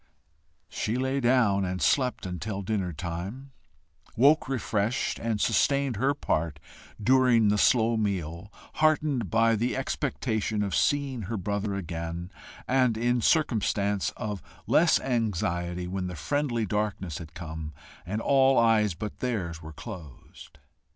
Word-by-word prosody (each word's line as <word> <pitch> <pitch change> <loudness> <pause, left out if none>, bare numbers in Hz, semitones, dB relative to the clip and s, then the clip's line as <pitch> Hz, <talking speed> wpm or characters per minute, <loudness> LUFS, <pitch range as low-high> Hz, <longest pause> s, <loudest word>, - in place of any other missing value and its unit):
She 110 +3 -2
lay 130 +1 0
down 120 -6 +3
and 90 0 -2
slept 130 -1 +1
until 95 +3 -4
dinner 95 -3 -1
time, 90 - -6 0.6
woke 135 +2 +4
refreshed, 115 -2 -1
and 115 -2 -1
sustained 135 +4 +2
her 135 +5 +1
part 80 - -1 0.4
during 120 -1 +4
the 105 0 +2
slow 115 -1 +4
meal, 95 -3 -3 0.3
heartened 150 - +2
by 115 0 +3
the 120 +4 -1
expectation 115 -6 -1
of 100 -3 -3
seeing 140 -4 +1
her 115 - -2
brother 100 +1 -2
again 85 -1 -5 0.4
and 125 -3 +2
in 120 +1 +1
circumstance 105 - +1
of 105 -3 -4 0.2
less 165 0 +4
anxiety 90 -7 -1
when 95 0 -3
the 90 - -6
friendly 120 - -1
darkness 100 -5 -2
had 80 -1 -11
come, 80 -2 -6 0.3
and 105 +5 -3
all 135 0 +4
eyes 110 -5 +3
but 105 +4 -6
theirs 90 -10 -3
were 80 -1 -9
closed. 80 - -11
110 Hz, 130 wpm, -27 LUFS, 90-125 Hz, 0.6 s, woke